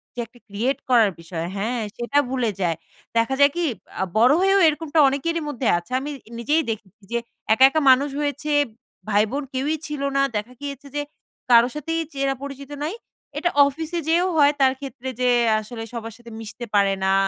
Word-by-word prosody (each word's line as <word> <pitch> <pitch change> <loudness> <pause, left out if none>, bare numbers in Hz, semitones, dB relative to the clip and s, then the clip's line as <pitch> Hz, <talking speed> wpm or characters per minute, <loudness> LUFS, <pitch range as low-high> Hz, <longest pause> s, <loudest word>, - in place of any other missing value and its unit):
যে - - -7
একটা 235 +2 -21
create 225 +7 -1
করার 230 -5 +5
বিষয়। 165 0 -5
হ্যাঁ? 230 +5 -1 0.2
সেটা 240 +4 +1
ভুলে 250 -4 0
যায়। 170 -3 +1 0.4
দেখা 230 +4 +2
যায় 285 0 +6
কি? 345 0 0 0.4
আ - - +3
বড় 245 +5 +6
হয়েও 390 +1 +4
এরকমটা 310 +1 0
অনেকেরই 330 +5 -1
মধ্যে 255 -4 -2
আছে, 175 +7 -9
আমি 285 +3 -5 0.3
নিজেই 300 +7 +2
দেখেছি 215 -1 -9
যে 235 - +1 0.4
একা, 255 - +4
একা 315 +3 0
মানুষ 275 +3 +3
হয়েছে 290 +1 -2 0.6
ভাই 205 0 +4
বোন 285 +2 -2
কেউই 275 +4 0
ছিল 295 -2 -5 0.2
না - - +4
দেখা 210 +4 -3
গিয়েছে 280 0 -6
যে, 290 - 0 0.5
কারো 235 0 +7
সাথেই 325 +2 -2
চেনা 275 -1 0
পরিচিত 280 0 -8
নাই। 315 +5 -2 0.4
এটা 350 - +1 0.2
অফিসে 320 +4 -4
যেয়েও 345 +3 +3
হয় 290 -1 +6
তার 260 -1 +5
ক্ষেত্রে, 270 -2 -6
যে 250 - +3 0.3
আসলে 225 +1 -7
সবার 230 -1 -6
সাথে 235 -1 -13
মিশতে 225 +2 -7
পারে 200 -1 +4
না, 190 - +3
265 Hz, 185 wpm, -23 LUFS, 230-290 Hz, 0.6 s, কারো